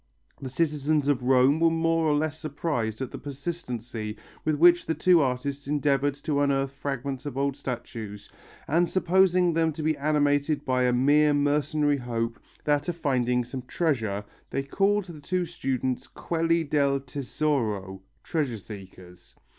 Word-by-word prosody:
The 135 - -5
citizens 150 +1 0
of 140 -3 +2
Rome 130 +4 +4
were 165 0 +5
more 165 0 +1
or 150 - +3
less 155 +1 -1
surprised 140 -7 -2
at 130 - -6
the - - -7
persistency 125 -7 -5 0.3
with 155 - +1
which 175 +3 +5
the 160 - 0
two 180 -3 +5
artists 140 +1 -2
endeavoured 145 -1 +1
to 145 -2 +1
unearth 135 -1 +1
fragments 140 0 -4
of 135 - -5
old 140 0 0
statues, 115 -6 -6 0.4
and 170 +3 +2
supposing 185 -1 +3
them 165 0 +2
to 155 +1 -5
be 155 0 +2
animated 145 0 +1
by 125 -1 +2
a 125 - +3
mere 145 +4 +4
mercenary 145 0 +1
hope, 115 -2 -3 0.2
that 145 +1 +1
of 175 - -2
finding 125 -5 +1
some 130 +2 -6
treasure, 120 - -1 0.2
they 135 - -2
called 200 +7 +1
the 165 -5 -10
two 180 +3 -1
students 130 -6 -2
quelli 165 0 0
del 140 -2 +1
tesoro 125 -8 -2 0.2
(treasure 145 -8 -1
seekers). 95 -3 -12
145 Hz, 155 wpm, -26 LUFS, 125-155 Hz, 0.4 s, were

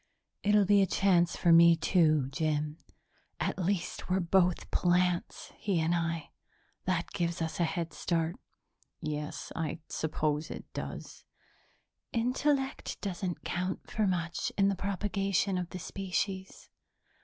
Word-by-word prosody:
"It'll 205 0 +4
be 200 +1 +5
a 195 - +3
chance 175 -2 +3
for 170 -2 +4
me, 170 0 +8
too, 155 -4 +3
Jim. 150 +1 -1 0.6
At - - -1
least 180 0 -2
we're 185 +1 +2
both 180 0 +2
plants, 180 0 +1
he 195 -5 0
and 160 +2 +2
I. 165 -3 -1 0.5
That 180 -2 0
gives 170 -1 -1
us 160 +1 -3
a 170 - +4
headstart." 165 0 -1 0.7
"Yes, 150 -1 -4
I 160 -1 -2
suppose 155 -1 -1
it - - -7
does." - - -6 0.9
"Intellect 265 +3 0
doesn't 185 -3 -3
count 185 +1 -3
for 215 -2 +1
much 175 -2 -1
in 195 0 +4
the 200 - 0
propagation 195 -1 0
of 175 -1 -4
the - - -6
species. 190 +1 -4
175 Hz, 130 wpm, -31 LUFS, 165-195 Hz, 0.9 s, me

